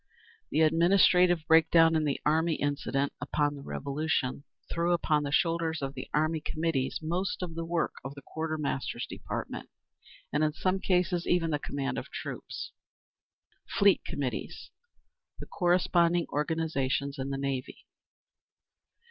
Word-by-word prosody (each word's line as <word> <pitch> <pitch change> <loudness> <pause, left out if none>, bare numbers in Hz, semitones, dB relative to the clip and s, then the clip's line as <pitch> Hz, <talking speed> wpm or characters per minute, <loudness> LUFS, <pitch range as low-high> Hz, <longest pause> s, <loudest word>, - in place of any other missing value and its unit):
The 155 - +1
administrative 175 +1 +4
break 160 0 +6
down 165 -1 +6
in 155 -1 +2
the 145 - 0
army 160 +2 +2
incident 140 -1 -1
upon 145 0 0
the 140 - -9
Revolution 140 -1 -2 0.2
threw 170 +1 +1
upon 155 -3 +2
the 145 -1 -3
shoulders 165 0 +1
of 135 0 -3
the 130 - -7
Army 155 +1 +1
Committees 155 -5 -1
most 180 +4 -2
of 175 -2 -5
the 165 0 -4
work 165 0 -1
of 135 +2 -7
the 140 - -11
Quartermaster's 150 -7 -3
Department, - - -6 0.6
and 150 - +2
in 155 -1 +1
some 185 +4 0
cases, 180 -2 +1
even 170 -2 +2
the 150 - 0
command 140 -1 -3
of - - -9
troops. - - -6 1.0
8. - - -6
Fleet 200 -1 +5
Committees. 135 -3 -4 0.7
The - - -7
corresponding 175 -1 +2
organisations 145 -3 -1
in 130 +1 -3
the 135 - -2
Navy. 135 -2 -4
155 Hz, 140 wpm, -29 LUFS, 140-170 Hz, 1.0 s, break